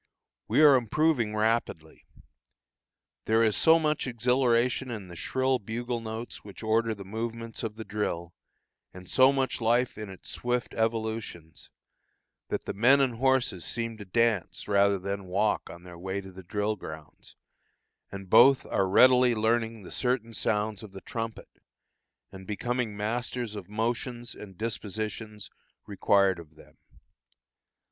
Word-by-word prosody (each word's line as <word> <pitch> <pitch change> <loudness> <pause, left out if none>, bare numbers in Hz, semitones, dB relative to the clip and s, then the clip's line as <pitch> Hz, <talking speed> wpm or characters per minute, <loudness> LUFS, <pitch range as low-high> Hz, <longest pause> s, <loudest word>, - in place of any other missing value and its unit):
We 155 - +4
are 145 -3 +8
improving 125 -2 +1
rapidly. 110 -7 -1 1.2
There 110 +1 +3
is 110 -2 +3
so 160 0 +6
much 155 -3 0
exhilaration 125 +1 +1
in 105 -6 -6
the 85 - -10
shrill 130 +7 0
bugle 120 +3 -4
notes 110 +1 -7
which 100 +2 -11
order 110 0 +1
the 100 -1 -10
movements 115 +2 -5
of 110 -2 -4
the 110 - -7
drill, 85 -5 -3 0.6
and 90 0 -11
so 130 +6 +5
much 135 -2 -1
life 120 0 +1
in 105 -2 -6
its 95 -3 -11
swift 125 0 -2
evolutions, 110 -7 -3 0.8
that - - -3
the - - -3
men 125 +7 +5
and 130 -4 +1
horses 130 -8 +1
seem 115 -1 -3
to 105 - -8
dance 110 -2 0
rather 100 -1 +3
than 100 +1 -4
walk 100 +4 0
on 85 - -11
their 90 -1 -11
way 95 +2 -3
to 95 -1 -10
the 95 +1 -11
drill 105 +4 -2
grounds, 80 -6 -11 0.8
and 100 -1 -8
both 125 +7 +6
are 95 -1 0
readily 125 +3 +6
learning 110 0 0
the - - -10
certain 125 -2 -1
sounds 105 -1 -1
of 105 -3 -11
the 95 - -9
trumpet, 115 -2 -6 0.7
and 95 -1 -11
becoming 120 0 -2
masters 120 +1 -3
of 100 -3 -8
motions 120 +2 -3
and 95 -4 -12
dispositions 110 0 -5 0.3
required 100 -2 +2
of 80 -2 -14
them. - - -18
110 Hz, 145 wpm, -28 LUFS, 100-120 Hz, 1.2 s, are